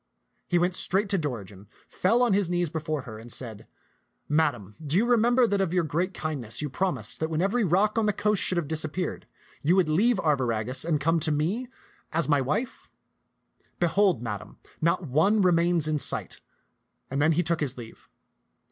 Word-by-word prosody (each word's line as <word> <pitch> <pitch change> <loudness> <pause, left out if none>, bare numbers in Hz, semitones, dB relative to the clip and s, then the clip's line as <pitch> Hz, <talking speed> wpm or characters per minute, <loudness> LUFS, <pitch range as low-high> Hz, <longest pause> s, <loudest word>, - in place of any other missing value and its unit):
He 175 - +3
went 175 +1 +1
straight 195 +3 +3
to 195 - +1
Dorigen, 105 - -6 0.2
fell 230 +7 +2
on 235 -5 +2
his 195 -3 +1
knees 175 -3 0
before 155 -3 -3
her, 110 -2 -9
and 115 +2 -12
said, 115 -5 -7 0.3
" - - -47
Madam, 115 -10 -2
do 155 +2 -1
you 220 - +3
remember 240 +1 +4
that 200 -3 0
of 185 -3 -1
your 180 -2 +2
great 170 +5 -1
kindness 145 - -4
you 150 -2 -3
promised 190 +5 -2
that 160 - -1
when 160 -1 -2
every 205 +6 +1
rock 200 +5 +2
on 215 - +1
the - - +4
coast 210 -1 0
should 185 - +2
have 170 -4 -1
disappeared, 160 +3 -3 0.3
you 165 +5 +3
would 185 -4 +3
leave 210 +9 +3
Arviragus 130 -5 0
and 160 -3 +1
come 165 +3 +1
to 155 0 0
me 175 +12 -1 0.4
as 160 -3 0
my 145 -2 +3
wife? 210 - -3 0.9
Behold, 175 - +2
Madam, 105 -4 -6 0.2
not 170 +2 +1
one 165 +10 +2
remains 170 -2 +2
in 155 -1 0
sight"; - - -3 0.7
and 135 +1 -1
then 155 +2 +4
he 175 +3 +1
took 170 -1 -1
his 135 -4 -2
leave. 115 -2 -12
165 Hz, 190 wpm, -26 LUFS, 145-190 Hz, 0.9 s, remember